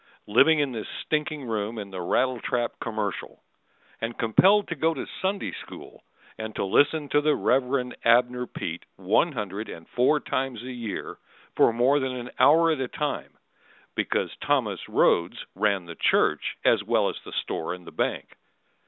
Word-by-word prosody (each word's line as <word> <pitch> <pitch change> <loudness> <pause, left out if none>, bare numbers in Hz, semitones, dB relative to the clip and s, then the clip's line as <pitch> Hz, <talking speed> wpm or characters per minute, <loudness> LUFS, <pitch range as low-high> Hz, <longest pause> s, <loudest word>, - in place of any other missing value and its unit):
Living 135 +9 +5
in 145 -3 +1
this 110 -3 -5 0.2
stinking 150 -1 -1
room 110 -1 -3
in 100 -2 -6
the 95 -1 -5
rattle 130 +7 +1
trap 120 -1 -1
"Commercial." 110 -3 -4 0.6
And 115 +1 -3
compelled 190 - +4
to 165 - -2
go 160 +2 +1
to - - -4 0.2
Sunday 195 +1 -1
School, - - -11 0.4
and 110 -1 -6
to - - -1
listen 145 +9 +2
To 145 - +3
the 150 0 +3
Rev. 125 -1 +1
Abner 125 +1 +3
Peet 85 +1 -5
one 105 - +2
hundred 105 -2 -5
and 80 - -10
four 130 +5 +2
times 130 -4 -3
a 130 - -6
year 115 -4 -6 0.4
For - - +5
more 125 +5 +3
than 130 -2 -2
an 125 -1 -6
hour 165 +3 +6
at 155 - -1
a 130 - -1
time, 150 +3 -4 0.6
Because - - -1
Thomas - - 0
Rhodes 85 +1 +2
ran 100 -2 0
the 85 - -8
church - - +1
As - - +4
well - - +2
as - - -3
the - - -10
store 85 +2 -3
and 90 -1 -15
the - - -10
bank. - - -2
125 Hz, 170 wpm, -26 LUFS, 105-145 Hz, 0.6 s, hour